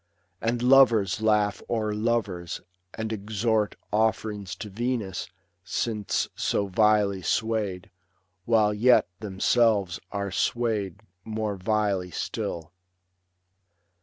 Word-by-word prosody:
And 120 +1 -1
lovers 120 -7 +5
laugh 105 -1 +2
o'er 110 -2 0
lovers, 105 -6 -1 0.4
and 110 0 -3
exhort 110 +1 0 0.2
Offerings 105 -3 0
to 105 - -8
Venus 110 -4 -3 0.3
since 105 0 -1
so 100 - 0
vilely 100 -1 +2
swayed, 105 -3 -1 0.5
While 110 -2 +3
yet 120 +4 +4
themselves 105 -1 +1
are 100 -1 -3
swayed 105 -3 -1 0.2
more 110 -1 -3
vilely 100 -2 0
still. 85 0 -4
105 Hz, 95 wpm, -26 LUFS, 100-110 Hz, 0.5 s, lovers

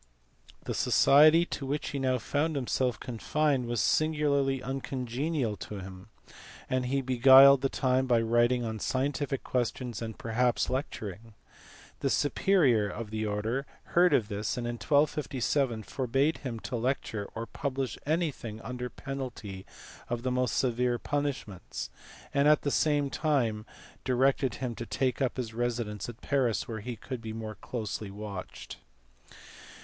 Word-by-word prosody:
The - - -3
society 155 +4 +6
to 140 - -5
which 145 +2 -2
he 140 - -3
now 130 -1 +1
found 150 +5 -1
himself 125 -2 0
confined 135 +2 0
was 120 -1 -1
singularly 140 -1 +2
uncongenial 135 -1 -2
to 105 - -7
him, 95 +1 -9 0.6
and 130 -1 0
he 135 +2 +1
beguiled 130 +2 +8
the 135 - +1
time 130 0 +1
by 120 -2 +4
writing 120 +2 +2
on 110 -1 -4
scientific 135 +3 -1
questions 125 -2 -2
and 110 -1 -5
perhaps 120 +2 0
lecturing. 115 - -5 0.6
The - - 0
superior 145 - +3
of 105 0 -6
the 110 0 -2
order 110 +7 -2 0.3
heard 175 0 +5
of 120 -7 +3
this, 105 +2 -3
and 120 - -3
in 120 0 -3
1257 135 -2 +1
forbad 135 +7 0
him 120 -5 -5
to - - -4
lecture 120 -3 -2
or 115 +1 -3
publish 135 0 -3
anything 145 -9 -2
under 125 +2 -5
penalty 125 -10 -7 0.4
of 120 0 -2
the 130 - 0
most 125 -2 0
severe 125 -1 +1
punish 145 -1 -2
ments, 95 -4 -7 0.4
and 140 +1 +3
at 150 0 +5
the 145 - 0
same 145 -2 +2
time 120 -9 0 0.4
directed 130 0 +2
him 125 -2 -3
to 115 - -6
take 125 +6 -1
up 130 -1 0
his 115 -3 -4
residence 115 -3 -2
at 120 +1 -10
Paris 130 -5 0
where 110 -2 -4
he 120 +3 -5
could 125 +2 -7
be 110 -1 -6
more 110 -1 -5
closely 110 -1 -5
watched. 100 -2 -7
125 Hz, 150 wpm, -29 LUFS, 115-140 Hz, 0.6 s, beguiled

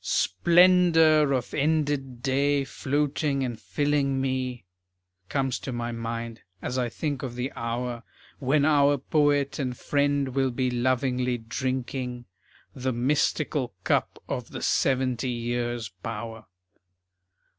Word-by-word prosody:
"Splendor 165 - +4
of 130 -3 -1
ended 145 -4 0
day 140 +1 +2
floating 140 +1 -1
and 120 -3 -3
filling 145 -1 0
me,"[B] 130 -3 -2 0.6
Comes 135 -3 0
to 135 - -5
my 120 -1 -3
mind 115 0 -5 0.2
as 125 - -4
I 125 -1 0
think 145 +1 -3
of 125 -4 -5
the 125 +2 -3
hour 120 +1 -3 0.4
When 140 +2 +2
our 145 -1 +4
poet 145 +1 +1
and 125 -3 -2
friend 145 -1 +1
will 135 0 +1
be 125 0 -1
lovingly 125 0 +1
drinking 125 +1 -3 0.5
The 130 -1 -2
mystical 135 0 0
cup - - +1
of - - -4
the - - -6
seventy 130 -1 +1
years' 120 -2 -2
power. 115 0 -6
130 Hz, 120 wpm, -26 LUFS, 120-145 Hz, 0.6 s, Splendor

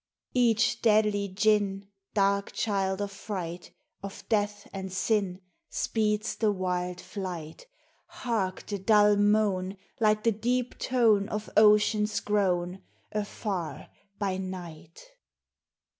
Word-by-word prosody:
Each 230 -3 +3
deadly 210 -2 +3
Djinn, 200 0 +1 0.3
Dark 200 -1 +2
child 195 -2 0
of 200 - -4
fright, 180 -4 -6 0.3
Of 195 0 -9
death 205 -2 0
and 190 -1 -5
sin, 190 -1 0 0.3
Speeds 215 0 -1
the 215 -2 +2
wild 180 -2 -2
flight. 180 - -7 0.4
Hark, 205 -7 -2
the 205 -1 -4
dull 210 +1 +5
moan, 205 -2 +2 0.2
Like 215 -1 +3
the 230 - +4
deep 245 +4 -1
tone 225 -5 +3
Of 210 0 -4
ocean's 210 0 +4
groan, 185 -3 0 0.3
Afar, 205 -4 -4 0.3
by 195 -3 -1
night 175 -4 -8
205 Hz, 110 wpm, -28 LUFS, 190-215 Hz, 0.4 s, dull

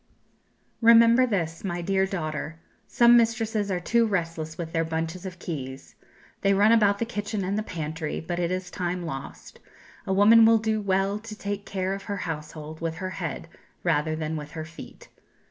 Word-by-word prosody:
Remember 230 +2 +7
this, 165 -7 -2
my 175 -3 -3
dear 190 +1 +1
daughter, 155 -3 -4 0.3
some 240 0 +5
mistresses 225 -3 +1
are 185 -2 0
too 230 +5 +2
restless 165 -5 -3
with 165 -2 -6
their 165 - +1
bunches 165 +3 -3
of 185 -1 -8
keys; 135 -7 -7 0.5
they 195 0 +3
run 205 +3 +5
about 205 -3 +4
the 230 - -1
kitchen 205 -2 -3
and 190 +2 -1
the 215 - 0
pantry, 160 -5 -4
but 175 +2 -4
it 170 -1 0
is 185 0 -3
time 180 0 -3
lost; 140 -5 -8 0.5
a - - -1
woman 210 +4 +7
will 225 0 +6
do 220 -1 -1
well 195 +1 0
to 220 0 -9
take 200 0 -4
care 190 -1 -2
of 195 - -5
her 200 - -3
household 155 -2 -6
with 165 -1 -2
her 185 +3 -5
head 165 -3 -5 0.4
rather 155 -2 +1
than 155 0 -3
with 150 -1 -6
her 155 -1 -5
feet. 165 +1 -12
185 Hz, 180 wpm, -26 LUFS, 165-205 Hz, 0.5 s, Remember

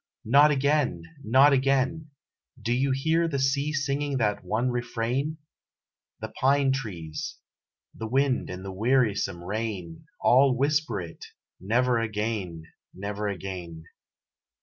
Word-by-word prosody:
"Not 140 +6 +6
again!" 140 - +1 0.2
"Not 130 +6 +5
again!" 135 +4 +1 0.5
Do 120 - -1
you 135 +3 +1
hear 160 +5 +1
the 145 -4 -2
sea 140 +2 +1
singing 145 -1 -1
that 105 -5 0
one 110 +7 0
refrain? 120 +5 -2 0.8
The - - -4
pine 135 0 +3
trees, 90 - -5 0.6
the 110 - -6
wind 135 +2 +1
and 90 +1 -7
the 95 - -6
wearysome 105 -5 +1
rain 95 -4 -5
All 130 0 +4
whisper 140 -5 +1
it; 85 -2 -9 0.4
"Never 120 +5 +1
again!" 105 -6 -3 0.3
"Not 105 +2 -4
again!" 90 -4 -6
120 Hz, 120 wpm, -26 LUFS, 100-140 Hz, 0.8 s, Not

